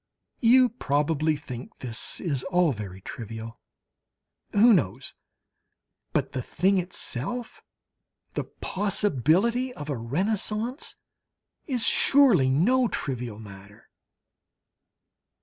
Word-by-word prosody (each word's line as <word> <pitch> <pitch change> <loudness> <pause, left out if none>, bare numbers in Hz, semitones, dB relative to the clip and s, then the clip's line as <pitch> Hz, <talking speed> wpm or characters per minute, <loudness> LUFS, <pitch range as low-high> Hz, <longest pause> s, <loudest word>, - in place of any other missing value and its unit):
You 250 +1 +6
probably 155 - 0
think 130 -4 -9
this 115 -4 -4
is 140 -7 -2
all 180 -3 +2
very 100 -5 -7
trivial? 115 +2 -8 0.9
Who 225 +3 +6
knows? 130 - -1 1.0
But - - -1
the 130 - -3
thing 190 +9 +1
itself, 180 - -5 0.7
the - - -3
possibility 205 - +1
of 145 0 -6
a 135 - -2
Renaissance, 210 - -2 0.7
is 250 -6 +1
surely 245 - +5
no 240 - +3
trivial 125 - -4
matter! 100 -1 -13
155 Hz, 95 wpm, -26 LUFS, -, 1.0 s, You